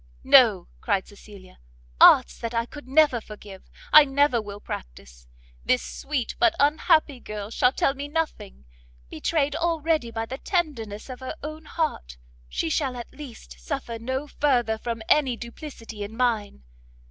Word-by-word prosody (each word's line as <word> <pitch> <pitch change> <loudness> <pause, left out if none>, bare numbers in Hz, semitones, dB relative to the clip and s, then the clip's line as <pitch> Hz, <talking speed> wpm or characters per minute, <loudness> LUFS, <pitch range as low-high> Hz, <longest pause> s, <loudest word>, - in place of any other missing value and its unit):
"No," 225 -10 +6
cried 200 -4 -1
Cecilia, 200 - -15 0.4
"arts - - +7
that 230 0 -4
I 230 0 +1
could 290 +2 -12
never 275 -3 +4
forgive, 205 -3 -12 0.2
I 305 - +11
never 280 -3 +2
will 205 -1 -9
practice; - - -9 0.4
this 125 - +1
sweet, 270 -5 -4
but 345 -1 +4
unhappy 295 -1 +3
girl 210 -2 -7
shall 250 - +3
tell 270 - +1
me 285 +1 -6
nothing; 290 - -4 0.5
betrayed 290 - 0
already 325 -5 0
by 225 0 -4
the 260 +4 -7
tenderness 250 - -2
of 255 -2 -8
her 260 - -6
own 310 +1 -7
heart, 65 - -3 0.3
she 65 - -2
shall 255 - -1
at 240 - -9
least 230 - -11
suffer 225 - -5
no 260 +5 -3
further 245 -7 0
from 230 -1 -4
any 265 -5 +3
duplicity 235 -3 -9
in 205 +2 -6
mine. 220 - -1
240 Hz, 150 wpm, -25 LUFS, 210-290 Hz, 0.5 s, I